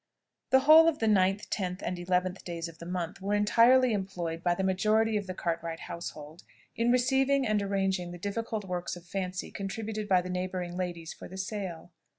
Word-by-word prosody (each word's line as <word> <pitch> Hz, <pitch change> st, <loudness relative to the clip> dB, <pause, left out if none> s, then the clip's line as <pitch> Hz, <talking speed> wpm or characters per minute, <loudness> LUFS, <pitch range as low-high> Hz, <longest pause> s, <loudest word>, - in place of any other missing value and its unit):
The 265 Hz, 0 st, +5 dB
whole 315 Hz, +3 st, +8 dB
of 325 Hz, -2 st, +2 dB
the 225 Hz, -, -1 dB
9th, 195 Hz, -1 st, +2 dB
10th, 185 Hz, -2 st, -3 dB
and 180 Hz, -, -2 dB
11th 180 Hz, +1 st, -1 dB
days 170 Hz, -1 st, -4 dB
of 165 Hz, -1 st, -13 dB
the 170 Hz, -, -8 dB
month 180 Hz, 0 st, -4 dB
were 200 Hz, +2 st, 0 dB
entirely 235 Hz, +4 st, +5 dB
employed 180 Hz, -5 st, -3 dB
by 175 Hz, 0 st, +1 dB
the 190 Hz, -, -2 dB
majority 215 Hz, +4 st, +2 dB
of 205 Hz, -2 st, -1 dB
the 185 Hz, -, -5 dB
Cartwright 165 Hz, -1 st, -3 dB
household 160 Hz, -1 st, -8 dB, 0.3 s
in 235 Hz, +1 st, +2 dB
receiving 265 Hz, +2 st, +3 dB
and 215 Hz, -2 st, +1 dB
arranging 195 Hz, -2 st, -1 dB
the 175 Hz, -, -7 dB
different 210 Hz, +3 st, -3 dB
works 180 Hz, -2 st, -3 dB
of 175 Hz, -1 st, -12 dB
fancy 185 Hz, 0 st, -4 dB
contributed 215 Hz, +2 st, -4 dB
by 185 Hz, -2 st, +4 dB
the 180 Hz, -, -6 dB
neighbouring 180 Hz, -1 st, -3 dB
ladies 175 Hz, -3 st, -4 dB
for -, -, -10 dB
the 190 Hz, -, -10 dB
sale. 190 Hz, -4 st, -5 dB
190 Hz, 190 wpm, -29 LUFS, 175-215 Hz, 0.3 s, whole